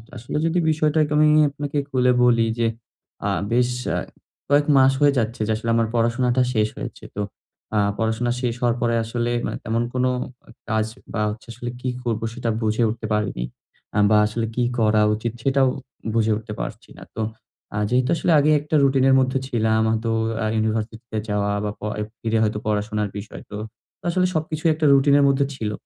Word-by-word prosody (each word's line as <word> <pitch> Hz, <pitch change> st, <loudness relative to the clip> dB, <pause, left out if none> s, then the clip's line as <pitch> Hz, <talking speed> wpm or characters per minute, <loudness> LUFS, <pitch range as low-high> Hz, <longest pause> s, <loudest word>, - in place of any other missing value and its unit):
আসলে 120 Hz, +5 st, -5 dB
যদি 170 Hz, +2 st, +1 dB
বিষয়টাকে 155 Hz, -1 st, +2 dB
আমি 150 Hz, 0 st, +5 dB, 0.2 s
আপনাকে 145 Hz, +1 st, -4 dB
খুলে 125 Hz, -1 st, +3 dB
বলি 115 Hz, -2 st, +4 dB
যে, 115 Hz, -, +3 dB, 0.6 s
আ -, -, +1 dB, 0.2 s
বেশ 125 Hz, +1 st, +3 dB, 0.3 s
আ -, -, 0 dB, 0.5 s
কয়েক 145 Hz, 0 st, +4 dB
মাস 135 Hz, 0 st, +6 dB
হয়ে 145 Hz, -1 st, +5 dB
যাচ্ছে 115 Hz, 0 st, -1 dB
যে, -, -, +1 dB
আসলে 115 Hz, +1 st, -4 dB
আমার 115 Hz, -1 st, +2 dB
পড়াশোনাটা 120 Hz, +2 st, +2 dB
শেষ 110 Hz, -1 st, +2 dB
হয়েছে, -, -, -7 dB
তো 105 Hz, -, -2 dB, 0.5 s
আ -, -, +3 dB, 0.2 s
পড়াশোনা 115 Hz, +2 st, 0 dB
শেষ 120 Hz, -2 st, 0 dB
হওয়ার 120 Hz, -1 st, +2 dB
পরে 115 Hz, -1 st, +2 dB
আসলে 120 Hz, +1 st, -2 dB
মানে -, -, -3 dB
তেমন 115 Hz, +2 st, 0 dB
কোনো 130 Hz, 0 st, +1 dB, 0.6 s
কাজ 110 Hz, -1 st, +1 dB, 0.3 s
বা 105 Hz, -, -1 dB
হচ্ছে 110 Hz, +3 st, -8 dB
আসলে 120 Hz, +1 st, -6 dB
কী 130 Hz, -, -1 dB
করব? 115 Hz, -3 st, -1 dB
সেটা 120 Hz, -1 st, -3 dB
বুঝে 110 Hz, +2 st, +1 dB
উঠতে 110 Hz, 0 st, -4 dB
পারিনি, 105 Hz, -13 st, -1 dB, 0.5 s
আ -, -, 0 dB
বা 105 Hz, -, +5 dB
আসলে 115 Hz, +1 st, -2 dB
কি 125 Hz, -, +1 dB, 0.2 s
করা 110 Hz, -1 st, +3 dB
উচিত? 115 Hz, +1 st, -3 dB
সেটাও 135 Hz, -1 st, +3 dB, 0.5 s
বুঝে 110 Hz, -1 st, +2 dB
উঠতে 110 Hz, -1 st, -7 dB
পারছি -, -, -7 dB
না। -, -, -10 dB
তো, 110 Hz, -, -3 dB, 0.5 s
আ -, -, -1 dB
যেহেতু 125 Hz, +2 st, +2 dB
আসলে 170 Hz, -, 0 dB
আগে 150 Hz, +2 st, +3 dB
একটা 150 Hz, +2 st, -3 dB
রুটিনের 135 Hz, -1 st, +4 dB
মধ্যে 130 Hz, +1 st, +1 dB
ছিলাম 110 Hz, -3 st, +1 dB
হয়তো 115 Hz, +1 st, -1 dB, 0.3 s
আ -, -, 0 dB
ইউনিভার্সিটিতে 110 Hz, +1 st, -2 dB
যাওয়া 100 Hz, 0 st, 0 dB
বা 105 Hz, -, -1 dB
প -, -, -55 dB, 0.4 s
ফিরে 115 Hz, 0 st, 0 dB
হয়তো 105 Hz, -1 st, 0 dB
পড়াশোনার 105 Hz, 0 st, -1 dB
বিষয়; 100 Hz, +1 st, -8 dB
তো 105 Hz, -, -5 dB, 0.5 s
আসলে 180 Hz, +1 st, +2 dB
সবকিছুই 155 Hz, +1 st, 0 dB
একটা 155 Hz, 0 st, -1 dB
রুটিনের 140 Hz, +1 st, +5 dB
মধ্যে 140 Hz, 0 st, +3 dB
ছিল। 105 Hz, -4 st, -3 dB
120 Hz, 180 wpm, -22 LUFS, 110-135 Hz, 0.6 s, মাস